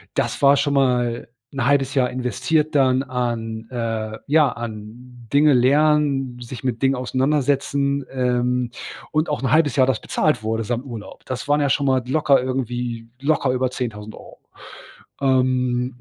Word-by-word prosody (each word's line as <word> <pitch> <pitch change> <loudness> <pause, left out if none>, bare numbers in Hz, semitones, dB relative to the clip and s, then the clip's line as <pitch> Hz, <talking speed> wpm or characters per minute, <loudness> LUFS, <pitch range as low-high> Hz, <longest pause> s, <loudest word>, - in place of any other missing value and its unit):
Das - - -1
war 140 0 +6
schon 140 +1 0
mal 125 -4 +1 0.2
'n 135 -3 -1
halbes 135 -1 +2
Jahr 125 -3 +2
investiert 145 +6 -1
dann 130 -2 +3
an, 115 -3 -3
äh 115 -2 -3
ja, 150 -2 +4
an 120 +2 -9
Dinge 145 0 +5
lernen, 135 -1 +2
sich 120 +2 -8
mit 120 -1 -2
Dingen 135 0 +3
auseinandersetzen, 140 +1 0
ähm, 125 -1 0 0.4
und 155 +2 +1
auch 150 - -2
'n 130 - 0
halbes 155 -4 +3
Jahr 130 0 +5
das 130 -4 0
bezahlt 125 -8 0
wurde, 110 +1 -1
samt 120 +3 -2
Urlaub. 115 -6 -9
Das 130 +2 -5
waren 145 +1 +2
ja 140 - +1
schon 140 - +1
mal 130 -2 +2
locker 145 -2 +3
irgendwie 125 -2 -3
locker 140 -2 +1
über 130 0 0
10000€. 110 -4 -7 0.8
Ähm, 125 -1 +1
130 Hz, 155 wpm, -21 LUFS, 120-140 Hz, 0.8 s, war